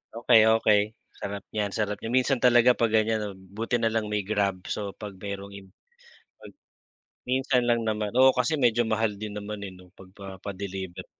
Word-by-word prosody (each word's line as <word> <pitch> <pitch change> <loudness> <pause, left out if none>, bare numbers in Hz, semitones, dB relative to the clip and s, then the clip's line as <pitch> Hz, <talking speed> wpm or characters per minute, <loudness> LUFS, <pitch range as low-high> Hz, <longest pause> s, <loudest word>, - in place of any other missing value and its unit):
Okey, 115 -1 +5
okey. 105 -2 +4 0.4
Sarap 100 0 -5
niyan, 105 -2 -2
sarap 105 -1 -1
niyan. 115 +1 -5
Minsan 130 0 +2
talaga 120 0 +5
'pag 115 -2 +1
ganyan 110 0 +2
'no, 105 - -4
buti 100 +6 -4
na 115 -1 +1
lang 110 -1 -1
may 105 -1 -1
grab, 100 -2 -1
so 100 -2 -4
'pag 100 -3 -9
merong 100 0 -6
im 95 -1 -13 0.7
pag - - -13 0.8
minsan 130 -1 +2
lang 115 -1 +1
naman. 105 -1 -1
Oo 130 0 +7
kasi 125 +5 0
medyo 120 -3 +3
mahal 110 -1 0
din 105 -1 -5
naman 105 0 -6
eh 100 - -5
'no 90 -1 -16
pagpapa-deliver. 95 -1 -8
105 Hz, 175 wpm, -26 LUFS, 100-115 Hz, 0.8 s, Oo